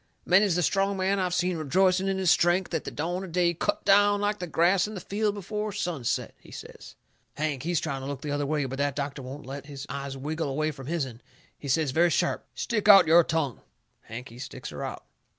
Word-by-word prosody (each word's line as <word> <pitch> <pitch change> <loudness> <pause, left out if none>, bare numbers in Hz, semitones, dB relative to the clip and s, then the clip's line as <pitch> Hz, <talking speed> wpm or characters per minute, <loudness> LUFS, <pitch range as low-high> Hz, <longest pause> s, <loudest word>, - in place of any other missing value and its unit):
Many's 190 0 +4
the 175 - +1
strong 195 +4 +1
man 190 +1 +1
I've 180 -1 0
seen 180 0 0
rejoicing 185 +5 +2
in 195 0 0
his 185 -3 +3
strength 175 +1 +2
at 160 - -2
the - - -3
dawn 175 +5 -3
of 185 - -8
day 175 0 +2
cut 170 - -2
down 205 +1 +5
like 205 0 0
the 180 - -4
grass 180 +4 +3
in 215 - -7
the - - -4
field 205 +3 -1
before 210 +2 -4
sunset," 175 - -2
he - - -18
says. - - -11 0.4
Hank, 145 -3 -2
he's 170 +1 0
trying 140 -4 -3
to 135 - -6
look 140 +1 -5
the 150 - -3
other 145 0 -1
way, 150 -1 0
but 135 +1 -5
that 140 -1 0
doctor 140 -1 -4
won't 135 +2 -8
let 140 +2 -7
his 140 -1 -7
eyes 140 -1 -5
wiggle 155 +2 -3
away 155 +3 -1
from 135 -3 -10
his'n. 135 -8 -3 0.3
He 145 - -10
says 145 +1 +1
very 170 +5 +3
sharp: - - 0
"Stick 215 -4 -1
out 195 -3 +10
your 165 +2 +6
tongue!" 160 -7 -2 0.4
Hank, 120 +3 -8
he 120 +2 -13
sticks 130 -1 -7
her - - -6
out. - - -6
165 Hz, 230 wpm, -27 LUFS, 140-190 Hz, 0.4 s, out